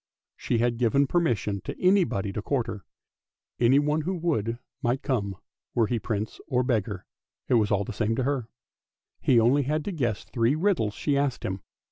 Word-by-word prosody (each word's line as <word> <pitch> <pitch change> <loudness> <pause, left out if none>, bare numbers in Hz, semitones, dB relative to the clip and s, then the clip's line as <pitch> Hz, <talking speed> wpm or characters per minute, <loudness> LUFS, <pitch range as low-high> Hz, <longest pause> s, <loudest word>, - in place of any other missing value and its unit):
She 120 - -1
had 120 0 +1
given 130 +4 +3
permission 120 - 0
to - - -6
anybody 175 - +2
to 105 - -3
court 125 +1 0
her. 105 -5 -6 0.8
Anyone 145 +5 +3
who 185 +5 -2
would 120 - -1 0.2
might 125 0 0
come, 100 -7 -1 0.4
were 115 - +4
he 115 +2 -1
Prince 105 0 -3
or 125 0 +1
beggar 105 -6 -1 0.2
— - - -62
it - - +3
was 110 -4 +4
all 100 -1 +2
the - - -6
same 110 +2 0
to 130 - 0
her; 130 -4 -1 0.7
he 120 - +4
only 125 +6 +4
had 150 +3 -1
to - - -2
guess 120 - -1
three 120 +3 +1
riddles 155 - +1
she 145 - 0
asked 140 -3 0
him. 95 -2 -3
120 Hz, 185 wpm, -27 LUFS, 110-145 Hz, 0.8 s, were